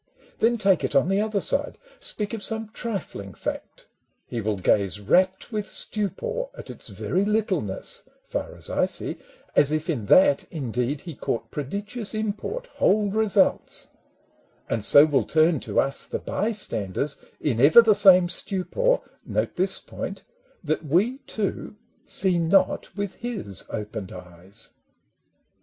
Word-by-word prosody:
Then 235 +1 +3
take 195 -4 +2
it - - -2
on 140 +5 +4
the 195 +1 +2
other 215 -1 0
side, - - 0 0.2
Speak 210 +1 -2
of 225 - -4
some 220 +1 -3
trifling 190 - -6
fact, - - -6 0.2
— - - -48
he 120 - -2
will 105 -1 -1
gaze 95 0 +1
rapt 185 - +1
With 210 -2 -3
stupor 480 - -1
at - - -8
its - - -8
very 190 - -1
littleness, 220 - -1
(Far - - -5
as - - -2
I - - +1
see) - - -3 0.4
as 145 - +4
if 155 +2 -1
in 115 -9 -4
that 145 - +5
indeed 130 -1 -2
He 170 - -8
caught 115 -4 -4
prodigious 205 - -4
import, 215 - -3
whole 205 +1 +3
results; 210 -2 +3 0.8
And 115 -2 -2
so 145 +7 +8
will 145 -3 +2
turn 160 -1 +3
to - - -1
us 135 0 0
the - - -3
bystanders 150 - -2 0.2
In 125 -6 -1
ever 160 - +8
the 220 -2 +5
same 185 -3 +7
stupor 200 - +1 0.2
(note - - -2
this - - +2
point) - - -7 0.4
That 155 0 -1
we 195 - +1
too 210 -1 -3 0.3
see 185 -3 +1
not 185 +4 +1
with 200 -2 -4
his 215 - -4
opened 105 -2 -5
eyes. 90 +4 -7
185 Hz, 150 wpm, -24 LUFS, 135-215 Hz, 0.8 s, so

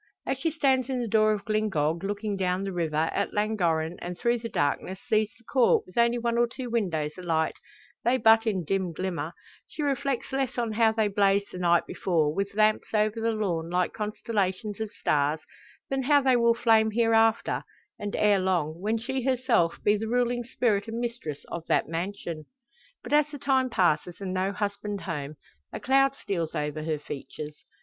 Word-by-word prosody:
As 270 - -2
she 325 - +1
stands 270 -5 +1
in 260 -1 -1
the 240 - -2
door 215 0 +4
of 205 -2 -2
Glyngog, 185 -7 0
looking 205 +1 -2
down 185 0 0
the 195 - -3
river, 160 -2 0
at 200 - -1
Llangorren, 175 -6 0
and 175 0 -5
through 240 0 +1
the 230 0 -5
darkness 185 +3 -1
sees 215 -1 +2
the 230 - -25
Court 245 +1 +3
with 185 - -17
only 235 0 +3
one 235 0 0
or 240 - +4
two 245 0 -7
windows 165 -10 0
alight 165 -3 0 0.5
they 245 +2 +3
but 225 -1 +5
in 190 -5 0
dim 190 0 -1
glimmer 170 -2 -3 0.3
she 305 - -5
reflects 275 -2 -1
less 270 -2 -1
on 235 -2 0
how 220 +1 +3
they 220 -1 +1
blazed 200 0 +2
the 180 - -7
night 175 -1 +3
before, 160 -5 0
with 200 +3 -3
lamps 215 0 +2
over 215 +1 +1
the 230 0 +1
lawn 175 -7 -2
like 180 0 0
constellations 210 -2 -2
of 220 -1 -3
stars, 150 -3 0 0.5
than 270 0 +1
how 285 +2 +4
they 265 -2 +3
will 235 -1 +4
flame 220 -2 +4
hereafter, 225 0 +2 0.4
and 205 0 -4
ere 205 -2 +3
long 170 -4 0
when 215 +3 0
she 260 +4 -3
herself 250 -9 +1
be 205 - +4
the 220 +2 -4
ruling 245 +1 +1
spirit 230 -3 0
and 225 +1 -4
mistress 230 -12 -5
of 170 - -5
that - - +2
mansion. 170 -2 -4 0.6
But - - -5
as 300 0 +4
the 290 - -7
time 265 -2 +1
passes 175 -4 +1
and 190 -2 -4
no 190 +1 0
husband 205 0 -3
home, 150 -4 -5 0.4
a - - -5
cloud 270 +1 +3
steals 170 - -3
over 150 +1 -2
her 155 0 -1
features. 150 +1 -8
210 Hz, 190 wpm, -27 LUFS, 175-235 Hz, 0.6 s, but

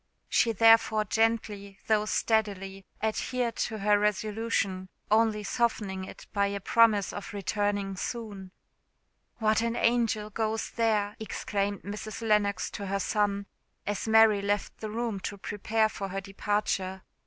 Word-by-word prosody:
She 230 - +3
therefore 225 -1 +5
gently, 210 -2 0
though 215 -1 +2
steadily, 195 -3 -1 0.2
adhered 235 +2 -1
to 220 - -2
her 205 0 +3
resolution, 210 -2 -1 0.2
only 215 -1 +3
softening 205 -4 -1
it - - -11
by 200 -1 +2
a 200 0 -3
promise 210 -1 +3
of 205 - -7
returning 205 -1 -1
soon. 200 -3 -5 0.9
"What 220 -1 +2
an 230 0 -1
angel 230 -3 +1
goes 220 +1 -2
there!" 215 -3 +1
exclaimed 205 -2 -2
Mrs. 210 +3 -6
Lennox 205 -2 +1
to 200 - -5
her 195 +1 -1
son, 200 0 0 0.4
as 205 +2 -3
Mary 220 -2 +6
left 205 +1 -1
the 215 - -5
room 225 -2 -2
to 200 +2 -5
prepare 215 +3 0
for 200 -2 -5
her 195 +1 -4
departure. 195 -1 -2
210 Hz, 135 wpm, -28 LUFS, 200-220 Hz, 0.9 s, Mary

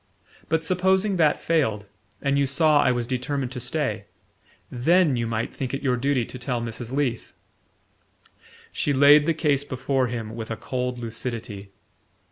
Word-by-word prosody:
But 160 0 0
supposing 190 +3 +2
that 155 -3 +3
failed, 125 -11 0 0.4
and 140 0 +2
you 140 - +2
saw 150 +1 +4
I - - +3
was 120 -1 -1
determined 130 +1 -2
to 130 - -5
stay? 125 -5 -2 0.7
THEN 160 +4 +3
you 115 -1 -1
might 115 0 -2
think 130 0 -3
it 135 - -6
your 130 -3 +2
duty 130 -1 0
to 125 - -9
tell 125 -1 -2
Mrs. 115 +1 -6
Leath." 130 -4 -2 1.4
She 145 - 0
laid 145 +2 +6
the 165 - +2
case 145 -3 +1
before 130 -1 -1
him 115 -2 -5
with 110 -1 -6
a 115 - -4
cold 125 -1 -3
lucidity. 115 -3 -6
130 Hz, 160 wpm, -24 LUFS, 120-145 Hz, 1.4 s, laid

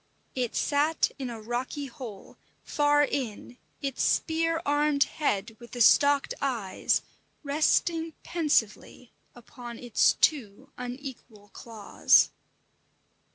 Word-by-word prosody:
It 250 -3 -3
sat 300 +2 +1
in 260 -2 -4
a 230 -2 -7
rocky 245 +6 -4
hole, 245 -8 -10 0.3
far 290 0 +2
in, 245 -3 -4 0.2
its 275 -2 -3
spear 330 0 +1
armed 290 0 +2
head 220 -7 -2
with 240 -1 -14
the 245 - -6
stalked 285 +4 +4
eyes 230 -9 -1 0.4
resting 320 +3 +1
pensively 255 -7 -1 0.2
upon 240 0 -10
its 245 -3 +2
two 270 -2 0
unequal 245 -4 -9
claws. 220 0 +2
265 Hz, 105 wpm, -27 LUFS, 235-290 Hz, 0.4 s, stalked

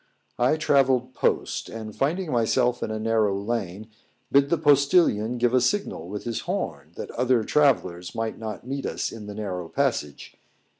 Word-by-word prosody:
I 125 +5 +3
travelled 130 -4 +2
post, - - -1
and 110 -2 -7
finding 165 +4 -1
myself 120 +1 +1
in - - -2
a 110 - -3
narrow 110 -3 +1
lane, 105 -2 -3 0.4
bid 140 0 +4
the 170 - +2
postillion 140 - +3
give 120 0 +1
a 130 - +4
signal 125 - -1
with 105 +1 -5
his 115 -2 -3
horn, - - -3
that - - -6
other 125 -1 +2
travellers 90 -12 +1
might 115 0 -3
not 110 -1 -6
meet 135 +2 -3
us - - -3
in 105 -2 -9
the 105 - -7
narrow 90 -5 -4
passage. 125 - -2
120 Hz, 165 wpm, -25 LUFS, 105-135 Hz, 0.4 s, bid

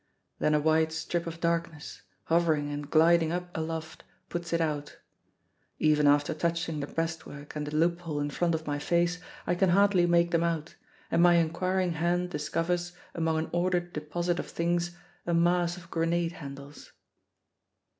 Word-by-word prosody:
Then 150 - +2
a - - +4
wide 160 +1 +2
strip 170 +1 -2
of 165 0 -6
darkness, 165 -2 -2 0.2
hovering 160 -3 +1
and 145 0 -5
gliding 165 +1 +4
up 175 0 -4
aloft, 160 0 -4 0.3
puts 170 -1 -4
it 170 - +2
out. 150 -3 -2 0.8
Even 150 -1 +3
after 145 0 +3
touching 165 0 -1
the 140 - -3
breastwork 160 -3 -5
and 150 -1 -3
the 150 - -4
loophole 165 -1 0
in 145 0 -2
front 170 +2 +1
of 160 0 -5
my 145 -1 -2
face 175 +3 +1 0.3
I 175 - +1
can 185 +1 +2
hardly 190 -1 +4
make 170 0 +3
them 170 0 +2
out, 165 -1 -2 0.4
and 170 - +3
my 175 0 +6
inquiring 180 +2 +1
hand 175 +2 0
discovers, 175 +3 -1 0.2
among 160 -1 0
an 160 - -2
ordered 175 0 0
deposit 170 +4 -2
of - - -4
things, 175 +1 -1 0.3
a 170 - +2
mass 175 +1 +2
of 170 -1 -13
grenade 165 +1 0
handles. 140 -3 -10
165 Hz, 165 wpm, -29 LUFS, 155-175 Hz, 0.8 s, my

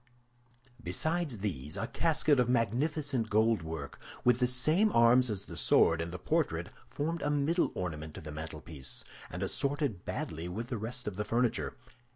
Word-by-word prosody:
Besides 160 - -1
these, 80 -8 -4
a - - -1
casket 155 0 +2
of 125 -1 +3
magnificent 125 +2 +1
goldwork, 85 -9 0 0.2
with 125 -1 +4
the 125 - +3
same 155 - +3
arms 120 +2 +5
as 100 -2 -4
the 85 - -9
sword 80 +3 +4
and 85 0 -4
the 90 - -5
portrait, 85 - 0 0.2
formed 165 +3 -2
a - - 0
middle 150 +4 +2
ornament 80 -4 -4
to - - -7
the 75 -1 -7
mantelpiece, 75 -2 -5 0.3
and - - -4
assorted 140 - 0
badly 80 +2 -4
with 110 +7 -5
the 120 - -2
rest 115 +2 -3
of 100 -3 -4
the 105 - 0
furniture. 120 +3 0
115 Hz, 165 wpm, -31 LUFS, 85-140 Hz, 0.3 s, arms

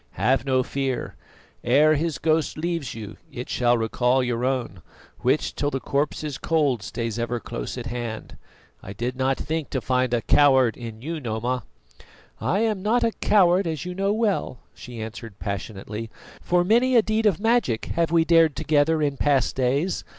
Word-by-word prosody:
Have 130 0 +1
no 130 -1 +2
fear. 135 -1 -3 0.5
Ere 155 +2 +5
his 155 +1 -1
ghost 160 -1 0
leaves 165 -7 -3
you 110 -2 -8
it 125 - -7
shall 120 -1 +2
recall 125 +3 +1
your 120 -1 -2
own, 125 -8 -2 0.4
which - - +1
till 145 - -1
the 135 - -2
corpse 145 +3 -1
is 145 -2 -4
cold 145 -8 +1
stays 115 +2 -4
ever 120 +1 -2
close 120 +2 -6
at 120 - -5
hand. 120 -2 -5 0.5
I 100 - -8
did 120 +5 -3
not 130 +1 0
think 160 0 -3
to 130 - -1
find 130 0 0
a 120 -1 0
coward 130 -5 +4
in 115 -2 -9
you, 165 +2 -4
Noma." 120 -1 -3 0.7
"I 200 - 0
am 215 -4 0
not 230 +4 +2
a 230 - +2
coward, 185 -3 +3
as 160 -2 -3
you 180 - -4
know 195 +2 0
well," 210 - -1
she 120 -2 -10
answered 110 -1 -8
passionately, 105 +3 -5 0.3
"for 175 0 +2
many 240 +7 +3
a 230 - +6
deed 215 0 +1
of 190 -6 +1
magic 225 - +1
have 170 -1 +1
we 165 -1 +4
dared 165 -3 +4
together 155 +1 +2
in 140 -2 -1
past 140 -4 +1
days. 140 +8 0
135 Hz, 180 wpm, -24 LUFS, 120-165 Hz, 0.7 s, a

